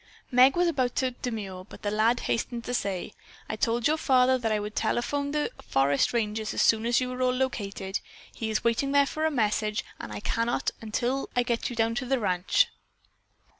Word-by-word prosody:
Meg 255 +2 +6
was 350 0 +3
about 260 -7 0
to 260 -1 +1
demur, 210 -7 -5
but 185 - -14
the 205 - -1
lad 220 +3 +2
hastened 235 0 -2
to 245 - -4
say: 200 -4 -2 0.3
"I - - -3
told 230 +2 0
your 310 +1 +2
father 260 -2 +4
that 225 -2 -1
I 215 - +1
would 210 +1 -6
telephone 280 +6 0
the 300 +9 -1
forest 135 +1 +2
ranger 220 -2 -1
as 215 - -3
soon 225 +1 +3
as 240 - +3
you 255 -1 -2
all 250 - -5
were 255 0 +2
located. 200 -7 -2 0.3
He 225 - -4
is 215 - -1
waiting 235 +4 +1
there 285 0 +5
for 310 +3 -1
a - - +2
message, 215 -5 0
and - - -7
I - - -5
cannot 230 +3 0
until 240 +5 -1
I 245 - +3
get 240 -2 -1
you 245 - -6
to 230 +3 0
the 270 +1 +2
ranch." 190 - +2
235 Hz, 205 wpm, -27 LUFS, 215-255 Hz, 0.3 s, Meg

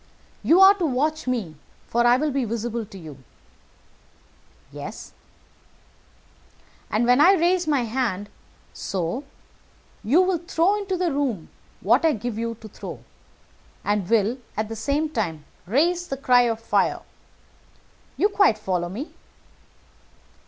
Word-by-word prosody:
"You 340 - +4
are 385 +1 +9
to 350 - +1
watch 300 +3 -1
me, 210 -12 -2 0.3
for 240 +1 +2
I 245 +1 +5
will 300 +2 0
be 275 -1 0
visible 230 0 -3
to 195 - -12
you." 150 -7 -11 1.5
"Yes." - - -8 1.8
"And 220 +3 +1
when 250 +3 +4
I 360 +6 +7
raise 355 -1 +2
my 290 -4 +2
hand 225 -4 -2 0.5
so 185 - -3 0.8
you 305 - +4
will 365 -2 0
throw 340 +3 +1
into 385 -2 -3
the 350 -2 0
room 260 - -2 0.3
what - - +3
I 320 -2 +4
give 225 0 -4
you 230 0 -3
to 220 - -9
throw, 205 - -9 0.8
and 205 -3 -1
will, 225 +3 +2 0.2
at 215 0 -2
the 225 - -5
same 285 +8 0
time, 180 - -3 0.2
raise 345 - +1
the 270 - -4
cry 245 -2 +4
of 225 -1 -2
fire. 230 - 0 1.2
You 410 - +4
quite 400 - +3
follow 180 -4 -2
me?" 240 - -7
245 Hz, 140 wpm, -24 LUFS, 215-315 Hz, 1.8 s, are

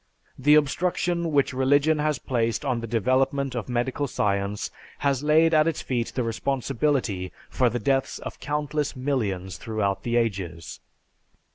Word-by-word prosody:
The 150 +3 +6
obstruction 170 +3 +1
which 140 -2 +2
religion 145 +4 +3
has 150 -1 +1
placed 115 +1 -1
on 130 -4 0
the 115 - -5
development 130 +4 +1
of 120 0 -4
medical 125 +4 -1
science 100 -3 -1 0.3
has 140 -2 0
laid 160 +2 +4
at 155 0 +5
its 165 - -1
feet 120 -3 -2
the 125 - 0
responsibility 120 -4 -1 0.2
for 125 -2 +3
the 120 - -2
deaths 135 +4 0
of - - -8
countless 150 0 -2
millions 105 -9 -2
throughout 105 -4 -2
the 120 0 -2
ages. 90 -9 -2
130 Hz, 145 wpm, -25 LUFS, 115-145 Hz, 0.3 s, The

